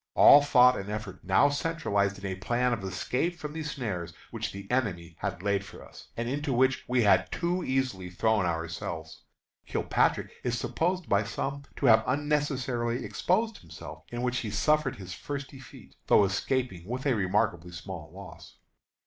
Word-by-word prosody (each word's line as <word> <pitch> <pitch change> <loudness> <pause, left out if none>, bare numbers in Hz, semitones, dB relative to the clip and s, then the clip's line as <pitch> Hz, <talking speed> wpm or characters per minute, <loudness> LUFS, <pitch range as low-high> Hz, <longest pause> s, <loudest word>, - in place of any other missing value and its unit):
All 145 - +9
thought 125 -3 +5
and 100 +1 -6
effort 105 -3 -5
now 95 +10 +4
centralized 140 -10 0
into 100 -1 -5
a - - -2
plan 120 +6 0
of 110 -4 -3
escape 125 - -2
from 150 -2 -6
the 160 - -4
snares 105 - -4 0.2
which - - -3
the 100 0 -8
enemy 90 -10 -1
had 90 - -4
laid 100 -1 +1
for - - -12
us, - - -14
and 115 0 -2
into 145 +3 -2
which 130 +2 +2
we 125 -1 +2
had 100 - +4
too 180 +1 -1
easily 130 - -1
thrown 105 +3 +1
ourselves. 80 -1 -4 0.5
Kilpatrick - - +1
is 120 0 0
supposed 180 +4 -1
by 100 +1 +3
some 140 +6 -4
to - - -2
have 110 -2 +7
unnecessarily 135 -4 0
exposed 220 +5 0
himself, 80 -1 -10
in 120 +1 -3
which 125 0 0
he 110 - -4
suffered 150 +9 +1
his 95 -2 -8
first 140 +8 -5
defeat, 135 -1 -13
though - - +6
escaping 95 -2 -2
with 125 +4 -4
a 135 - +3
remarkably 90 -4 0
small 85 -3 -8
loss. 90 -2 -12
120 Hz, 170 wpm, -28 LUFS, 95-140 Hz, 0.5 s, All